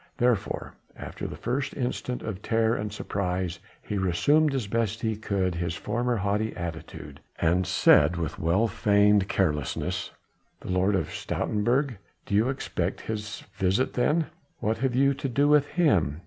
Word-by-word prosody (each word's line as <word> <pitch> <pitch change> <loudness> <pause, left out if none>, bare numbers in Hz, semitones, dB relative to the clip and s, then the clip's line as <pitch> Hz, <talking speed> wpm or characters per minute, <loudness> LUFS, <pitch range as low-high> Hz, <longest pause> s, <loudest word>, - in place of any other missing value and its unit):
Therefore 120 -5 0 0.2
after - - -6
the - - -7
first 130 +3 -3
instant 125 -1 -3
of 105 -3 -5
terror 115 +1 +2
and 105 0 -3
surprise 90 -3 -2 0.2
he 105 - -3
resumed 140 - +3
as 130 -5 -1
best 110 +1 -1
he 110 -1 0
could 100 -4 -1
his 85 -1 -2
former 120 +5 -1
haughty 105 +1 -1
attitude, 80 -4 -7 0.2
and 90 +2 +2
said 90 -1 +5
with 80 -4 -3
well 90 +8 +2
feigned 100 -1 +3
carelessness: 75 -8 -1 0.5
"The - - -5
Lord 95 +2 +2
of 95 - -1
Stoutenburg? 120 +4 0 0.3
Do - - -5
you 110 +5 +3
expect 95 -9 -2
his 105 -1 -5
visit 95 +6 +1
then? 150 +6 +2 0.3
What 110 +1 -1
have 130 -1 0
you 140 +2 +4
to 135 0 -4
do 140 +4 +2
with 145 -1 +5
him? 95 - +2
105 Hz, 155 wpm, -27 LUFS, 95-125 Hz, 0.5 s, said